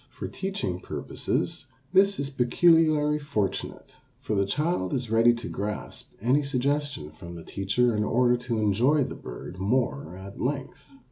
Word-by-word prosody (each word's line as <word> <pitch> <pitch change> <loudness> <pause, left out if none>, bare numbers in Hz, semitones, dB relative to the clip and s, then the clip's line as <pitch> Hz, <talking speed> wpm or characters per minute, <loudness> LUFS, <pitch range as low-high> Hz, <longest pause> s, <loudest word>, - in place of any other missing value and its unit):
For - - -6
teaching 195 - -3
purposes - - -3 0.3
this 195 +1 +4
is 140 0 -2
peculiarly 150 +3 +4
fortunate, 110 -10 -3 0.3
for - - -3
the 100 -1 +2
child 150 - 0
is 120 -4 -3
ready 115 +1 +6
to 120 - -6
grasp 105 +1 -5
any 125 +7 +3
suggestion 140 - -1
from 85 +2 -10
the 85 - -8
teacher 110 +5 +1
in 105 - +1
order 120 +3 +3
to 120 -1 -3
enjoy 115 +8 +3
the - - -4
bird 90 - -8
more 95 - 0
at 100 +1 -9
length. 135 +2 -3
125 Hz, 150 wpm, -27 LUFS, 100-145 Hz, 0.3 s, ready